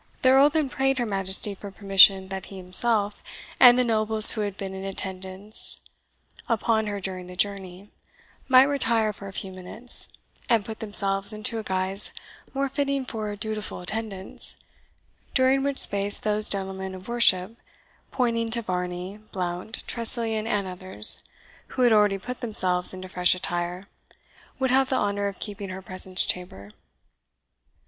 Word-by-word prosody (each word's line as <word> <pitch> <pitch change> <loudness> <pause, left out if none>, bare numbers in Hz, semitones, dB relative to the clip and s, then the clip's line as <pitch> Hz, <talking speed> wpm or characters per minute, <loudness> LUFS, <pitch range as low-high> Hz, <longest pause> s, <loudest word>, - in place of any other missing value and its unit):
The 255 - +4
Earl 270 +2 +5
then 305 -1 -1
prayed 270 +1 -1
her 240 - -1
Majesty 195 0 +4
for 200 +1 -10
permission 195 -1 +5
that 190 -1 -7
he 195 - -11
himself, 205 +3 +2 0.4
and 245 -1 +7
the 250 - +2
nobles 220 -1 +6
who 220 - -3
had 205 -1 -5
been 195 -1 -7
in 190 0 -8
attendance 190 +1 -2 0.7
upon 220 -1 0
her 205 -1 -4
during 185 -1 -7
the 180 - -11
journey, 195 0 -4 0.6
might 255 -1 +6
retire 230 -6 0
for 200 -1 -11
a - - -9
few 190 0 -4
minutes, 185 +6 -3 0.4
and 225 -4 +1
put 220 0 -9
themselves 200 -1 +5
into 215 +2 -3
a - - -7
guise 190 +1 -1 0.4
more 275 0 -2
fitting 275 0 -3
for 215 -4 -6
dutiful 215 0 -6
attendance, 195 +1 -4 0.8
during 265 +1 +3
which 280 0 -3
space 200 0 +3
those 215 0 -2
gentlemen 190 -1 -5
of 185 0 -13
worship 225 -4 +1 0.5
(pointing 230 -3 -2
to 235 +1 0
Varney, 180 +1 -5
Blount, 180 +3 -5
Tressilian, 225 -2 0
and 205 -4 -2
others), 180 - +3 0.4
who 255 - -3
had 240 -2 +4
already 210 -2 +2
put 250 +6 -8
themselves 185 -6 +1
into 185 0 -7
fresh 180 -1 +1
attire, 175 0 -5 0.7
would 265 -2 -1
have 265 0 +2
the 265 - -1
honour 205 -2 -2
of 200 -2 -7
keeping 205 -2 -7
her 190 +1 -8
presence 185 0 0
chamber. 105 - -6
205 Hz, 155 wpm, -24 LUFS, 190-230 Hz, 0.8 s, and